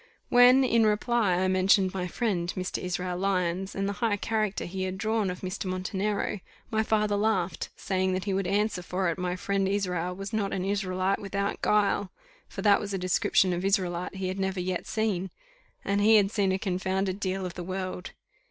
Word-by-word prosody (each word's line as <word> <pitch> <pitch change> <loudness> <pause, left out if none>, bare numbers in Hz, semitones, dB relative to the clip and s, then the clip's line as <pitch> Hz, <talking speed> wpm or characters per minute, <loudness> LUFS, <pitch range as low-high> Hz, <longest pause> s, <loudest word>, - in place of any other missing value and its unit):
When, 250 +2 +7
in 230 -3 +3
reply, 215 -2 +2
I 185 +1 +1
mentioned 185 0 +3
my 180 -2 -2
friend, 180 -4 -1
Mr. 185 0 -2
Israel 180 0 -3
Lyons, 185 0 -1
and 195 0 -1
the 200 - -1
high 220 -3 +2
character 215 -1 -1
he 190 +2 -5
had 185 0 -2
drawn 220 -1 0
of 180 - -5
Mr. 185 +1 -4
Montenero, 195 +3 -2 0.3
my 220 -1 +2
father 215 -1 +1
laughed, 200 -5 0
saying 190 -1 -1
that 185 0 -2
he 200 - -1
would 190 -1 0
answer 205 0 0
for 180 0 -1
it 170 - -3
my 180 0 -1
friend 195 +1 0
Israel 180 -3 -1
was 195 +2 -7
not 205 -2 -1
an 185 -1 -2
Israelite 195 -1 0
without 200 0 -2
guile; 205 -2 +2 0.4
for - - -7
that 205 -2 +5
was 205 -1 -4
a - - 0
description 185 0 +2
of 175 +1 -3
Israelite 180 -2 0
he 190 -1 -3
had 190 +1 -4
never 190 -1 -1
yet 180 0 -3
seen, 205 -4 -1 0.6
and 200 +1 +1
he 220 +2 +6
had 200 -2 +4
seen 200 -3 +1
a 190 - +1
confounded 190 0 -1
deal 190 -1 -2
of 180 - -5
the 175 - -6
world. 185 0 -5
195 Hz, 200 wpm, -28 LUFS, 185-205 Hz, 0.6 s, When